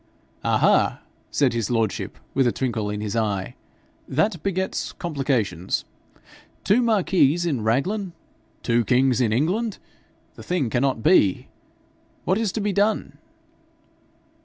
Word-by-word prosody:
'Ah! - - +2
ha!' - - +3 0.3
said 135 -4 +2
his 115 -3 -1
lordship, 115 -3 -1 0.2
with 135 -2 +3
a - - +3
twinkle 115 -5 -2
in 105 0 -4
his 105 0 -3
eye, 105 -4 -1 0.5
'that 165 +4 0
begets 190 0 -2
complications. 130 - -1 0.8
Two 220 +5 +3
marquises 185 - +2
in 140 -9 -1
Raglan? 175 - 0 0.5
Two 120 0 +2
kings 130 +2 +2
in 115 -3 +2
England! 185 - 0 0.6
The - - -12
thing 155 -10 -1
cannot 130 -2 0
be. 150 - +3 0.8
What 190 +4 +2
is 220 -4 0
to 220 - -2
be 205 0 0
done?' 205 +2 0
135 Hz, 130 wpm, -23 LUFS, 115-185 Hz, 0.8 s, ha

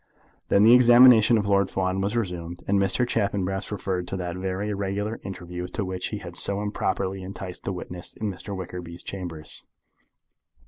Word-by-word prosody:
Then 100 - +4
the 115 +2 +8
examination 120 -2 +7
of 105 - 0
Lord 100 -1 +3
Fawn 95 0 -1
was 100 +4 -1
resumed, 90 -5 -4
and 100 0 +3
Mr. 100 +6 +2
Chaffanbrass 95 -3 -1
referred 95 -3 -2
to 95 - -3
that 90 -1 -4
very 95 +2 -3
irregular 100 +2 -2
interview 90 -2 -6
to 100 +3 -3
which 95 0 -3
he - - -4
had - - -9
so 100 0 +1
improperly 95 -2 -2
enticed 95 -1 -7
the - - -1
witness 90 -1 -6
in 110 -2 -2
Mr. 95 +2 -7
Wickerby's 90 -2 -7
chambers. 85 -5 -7
95 Hz, 170 wpm, -25 LUFS, 90-105 Hz, -, the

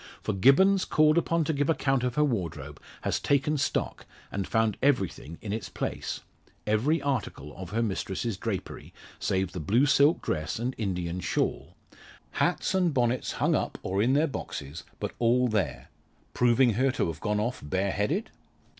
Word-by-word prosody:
For - - -1
Gibbons 185 - +5
called 155 0 +4
upon 170 0 +2
to 160 - -1
give 145 +1 0
account 135 -4 +1
of 125 -1 -1
her 150 - +3
wardrobe, 100 - -3 0.2
has - - 0
taken 145 +2 +1
stock, 145 - -2 0.2
and 100 -1 -3
found 110 -2 +1
everything 95 - 0
in 105 -2 -3
its 105 -3 -4
place - - -4 0.4
every 115 +10 +2
article 120 - -3
of 95 -1 -8
her 115 +4 0
mistress's 105 +1 -2
drapery 95 -1 -5 0.2
save 95 -1 0
the 90 - -5
blue 110 - +3
silk 145 +2 +4
dress 75 +1 -2
and 120 +3 -2
Indian 90 -4 -2
shawl - - -2 0.6
hats - - 0
and 180 -5 +2
bonnets 120 -1 +1
hung - - +1
up, - - -1
or 95 +2 0
in 125 +5 +3
their 150 +3 +4
boxes, 80 - -6 0.2
but - - -3
all 125 +2 +3
there, 110 -4 -2 0.4
proving 125 0 +4
her 130 +6 +2
to - - 0
have 80 -2 -4
gone 105 +1 0
off 120 +4 -2
bareheaded? 100 - -1
115 Hz, 165 wpm, -28 LUFS, 95-140 Hz, 0.6 s, Gibbons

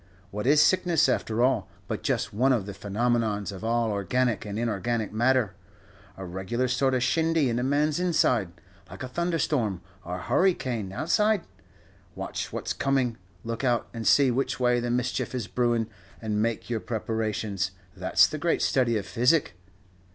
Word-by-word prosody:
What 105 +4 -3
is 145 +2 +5
sickness, 175 -5 +3
after 120 -2 0
all, 125 -5 +1 0.2
but - - -3
just - - -1
one 130 +6 +3
of 115 -7 +1
the 100 - -6
phenomenons 105 0 -1
of 95 +1 -9
all 115 0 +1
organic 110 +3 0
and 100 0 -4
inorganic 115 -1 -1
matter 120 -2 +2 0.6
a 95 - -6
regular 95 +8 -2
sort 130 +1 +1
of 125 - +1
shindy 160 0 +2
in 115 - 0
a - - -1
man's 145 +4 +1
inside, 130 - +2 0.4
like 95 +8 -8
a - - -4
thunderstorm, 145 - -1 0.2
or 90 +1 -5
a 90 - -6
hurry 185 -1 +3
cane 120 -7 -4
outside? 190 - +1 0.7
Watch - - -5
what's - - -3
coming, 130 -4 0 0.3
look 115 +2 -4
out 120 -3 +1
and 115 -1 -4
see 140 -3 +5
which 130 +2 -1
way 125 -1 +3
the 120 0 -2
mischief 125 +1 -1
is 120 -5 -2
brewin', 120 +1 0 0.3
and 105 -2 -1
make 115 0 -1
your 115 -2 -1
preparations. 110 -4 -2 0.3
That's 90 -1 +4
the 155 - -4
great 170 +2 +1
study 125 -5 +2
of 100 - -4
physic." 125 - +2
120 Hz, 170 wpm, -27 LUFS, 105-130 Hz, 0.7 s, is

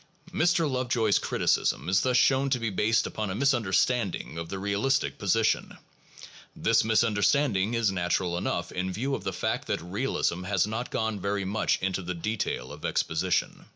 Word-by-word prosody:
Mr. 165 0 +2
Lovejoy's 125 -5 +1
criticism - - 0
is 95 +2 +3
thus 125 -1 +2
shown 135 +1 +3
to 130 - +2
be 115 -2 -2
based 110 +3 +2
upon 110 -2 -3
a 95 - -3
misunderstanding 120 - +1
of 85 0 -5
the 95 - -4
realistic 100 +8 0
position. 110 +3 +1 0.8
This - - +2
misunderstand 110 +3 +2
ing 100 +5 0
is 115 -3 +2
natural 90 -1 0
enough 85 0 -2
in 95 +1 -2
view 130 +9 -2
of - - -3
the - - -2
fact - - -2
that - - -1
realism 90 -1 -2
has 100 -1 +1
not 110 +4 -4
gone 110 -2 -2
very 100 0 -2
much 105 +3 0
into 95 0 -1
the 90 0 -4
detail 95 - -3
of - - -12
exposition. 90 +3 -1
105 Hz, 170 wpm, -27 LUFS, 95-120 Hz, 0.8 s, is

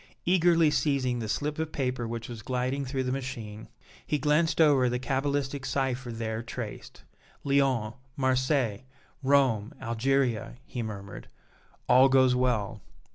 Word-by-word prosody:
Eagerly 170 -3 +4
seizing 135 -5 +1
the 110 -2 -4
slip 150 +6 -2
of 160 -1 -2
paper 125 -3 -2
which 115 0 -5
was 115 -2 -8
gliding 130 +3 -2
through 130 0 -2
the 130 - -2
machine, 120 -5 -5 0.4
he 150 - -1
glanced 150 +3 +2
over 140 -6 +5
the 125 - -1
cabalistic 135 +1 -1
cipher 130 -1 -2
there 110 -1 -3
traced. 115 -2 -8 0.4
"Lyons 135 -6 +1 0.2
Marseilles 130 -4 +1 0.4
Rome 130 -6 +2
Algeria," 120 0 0
he 125 - -5
murmured. 100 -3 -7 0.6
"All 130 +2 +6
goes 130 -1 +5
well." 125 -5 0
130 Hz, 130 wpm, -28 LUFS, 115-140 Hz, 0.6 s, All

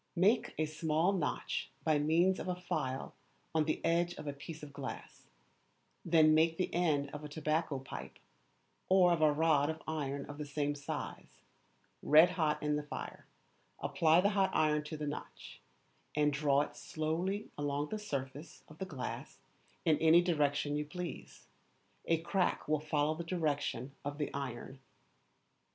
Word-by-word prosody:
Make 200 +7 +3
a 155 - +1
small 155 +4 +1
notch 165 -7 -2
by 155 -2 +3
means 170 +5 +3
of - - -5
a 180 - 0
file 135 -7 -3 0.4
on 160 -1 +2
the 155 - -2
edge 175 +1 +2
of 150 - -8
a 145 - -3
piece 150 +3 -9
of 145 -1 -9
glass, 140 -2 -8 0.8
then 160 -2 +5
make 160 +1 +3
the 185 - -1
end 150 -5 +1
of 150 0 -6
a 150 - -6
tobacco 155 0 -1
pipe, 130 0 -8 0.7
or 185 -2 +6
of 165 - -1
a 155 -1 +6
rod 150 -1 +3
of 160 0 -5
iron 140 -3 -2
of 145 0 -9
the 150 - -3
same 145 0 -1
size, 145 -1 -7 0.6
red 155 +4 +7
hot 150 -3 0
in 150 0 +1
the - - -1
fire, 145 - -7 0.5
apply 165 +1 +3
the 200 - +3
hot 195 -2 +2
iron 150 -1 +3
to 155 +1 -5
the 150 - -4
notch, 145 0 -7 0.5
and 150 -1 +3
draw 140 -1 +3
it 145 - -4
slowly 170 +6 -2
along 145 0 -2
the 215 - -3
surface 145 -4 -6
of 155 - -15
the 190 - -2
glass 140 -8 -6 0.5
in 155 -2 +4
any 165 +2 +6
direction 145 -4 +1
you 150 - 0
please: 170 +3 -7 0.6
a 165 - +3
crack 180 +2 0
will 155 0 +2
follow 150 0 +1
the 165 +2 -5
direction 145 -7 -1
of 145 +1 -4
the 150 - -3
iron. 135 -1 -5
155 Hz, 165 wpm, -34 LUFS, 145-165 Hz, 0.8 s, red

